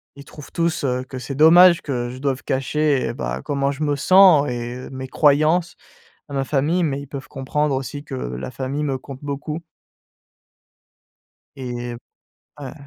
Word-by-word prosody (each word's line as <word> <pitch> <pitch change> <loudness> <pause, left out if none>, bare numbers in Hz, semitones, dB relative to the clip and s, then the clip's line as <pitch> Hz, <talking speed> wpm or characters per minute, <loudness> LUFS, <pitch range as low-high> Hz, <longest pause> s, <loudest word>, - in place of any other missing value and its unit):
ils 140 0 -12
trouvent 150 - -12
tous, 170 -3 -1
heu, 125 -1 0
que 130 0 -9
c'est 130 +2 -6
dommage 170 +3 +7
que 120 -4 -3
je 130 - -9
doive 135 -2 -2
cacher, 140 +1 0
et - - -3
bah, - - -4
comment 140 -1 0
je 145 +2 -4
me 145 -1 +1
sens 180 -1 +6
et 120 +1 -5
mes 130 0 -6
croyances 155 +5 +2 0.5
à - - -8
ma 135 -1 0
famille, 155 +6 +1
mais 140 -2 -1
ils 140 - -10
peuvent 135 -1 -8
comprendre 140 +2 -1
aussi 145 +2 -5
que 145 - -10
la 65 - -5
famille 135 +4 -3
me 135 -2 -1
compte 135 0 -10
beaucoup. 150 +3 -5 1.9
Et 120 -2 -5 0.7
ouais. 135 -3 -7
140 Hz, 170 wpm, -21 LUFS, 130-150 Hz, 1.9 s, dommage